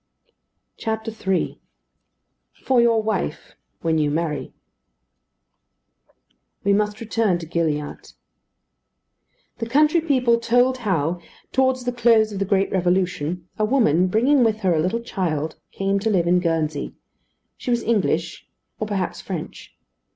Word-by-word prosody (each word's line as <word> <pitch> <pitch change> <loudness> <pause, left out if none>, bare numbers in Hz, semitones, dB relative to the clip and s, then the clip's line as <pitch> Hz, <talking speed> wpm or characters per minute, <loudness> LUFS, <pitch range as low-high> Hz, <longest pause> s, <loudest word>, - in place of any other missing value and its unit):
III 220 -4 -2 0.9
FOR 255 -2 +2
YOUR 230 -2 +3
WIFE: 210 -7 -3 0.3
WHEN 160 -1 +2
YOU 150 -1 +2
MARRY 155 -1 -2 2.1
We 200 - +3
must 210 +1 0
return 220 -4 +1
to 170 - -7
Gilliatt. 155 - -3 1.5
The 230 - -3
country 305 +6 +4
people 250 -7 +2
told 245 +2 +2
how, 175 -6 0 0.3
towards 260 -1 +2
the 245 - 0
close 230 -2 +4
of 195 - -4
the 195 - 0
great 195 0 +1
Revolution, 180 -2 0
a - - +2
woman, 200 - +3
bringing 245 +8 +3
with 220 -1 +1
her 185 -3 +2
a 160 - +1
little 185 +8 -1
child, 160 -9 -2
came 195 0 0
to 220 +3 -1
live 185 -5 +2
in 180 +1 +3
Guernsey. 160 -4 -1 0.6
She - - -7
was 240 -1 +1
English, 175 -7 -1 0.3
or 215 - -2
perhaps 200 -3 -2
French. - - -7
200 Hz, 130 wpm, -22 LUFS, 170-235 Hz, 2.1 s, country